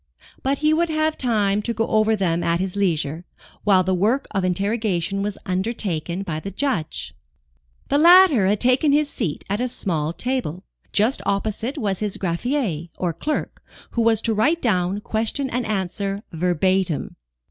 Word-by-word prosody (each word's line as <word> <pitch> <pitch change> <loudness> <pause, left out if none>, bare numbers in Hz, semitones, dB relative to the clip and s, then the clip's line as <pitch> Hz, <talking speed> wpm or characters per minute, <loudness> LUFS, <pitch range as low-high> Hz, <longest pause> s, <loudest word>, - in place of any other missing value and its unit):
But 275 +1 0
he 305 - +5
would 335 +1 +1
have 310 0 +1
time 210 -5 +1
to 235 +2 -3
go 225 +1 +1
over 220 0 +2
them 175 -4 0
at 170 0 +1
his 190 0 -3
leisure, 165 -5 0 0.4
while 190 -3 +4
the 185 +1 0
work 220 +10 +1
of 195 -2 -1
interrogation 195 0 0
was 205 0 -3
undertaken 185 -3 -2
by 160 -5 -3
the 195 - -6
Judge. 195 - -2 0.8
The 285 - +3
latter 340 - +7
had 205 +1 +2
taken 255 +4 +3
his 295 0 +2
seat 175 - -3
at 205 +4 -1
a 250 - +1
small 165 -10 -1
table, 190 - -3 0.2
and - - -36
just 220 +6 +2
opposite 220 +7 -2
was 200 -7 -1
his 210 -2 -2
greffier, 180 - -2
or 175 -2 -1
clerk, 295 - -3 0.3
who 235 - 0
was 225 -1 +3
to 225 - +1
write 295 +11 +2
down 190 - 0
question 225 +6 -1
and 245 -1 -2
answer, 200 0 -2
verbatim. 180 0 0
205 Hz, 170 wpm, -22 LUFS, 180-245 Hz, 0.8 s, latter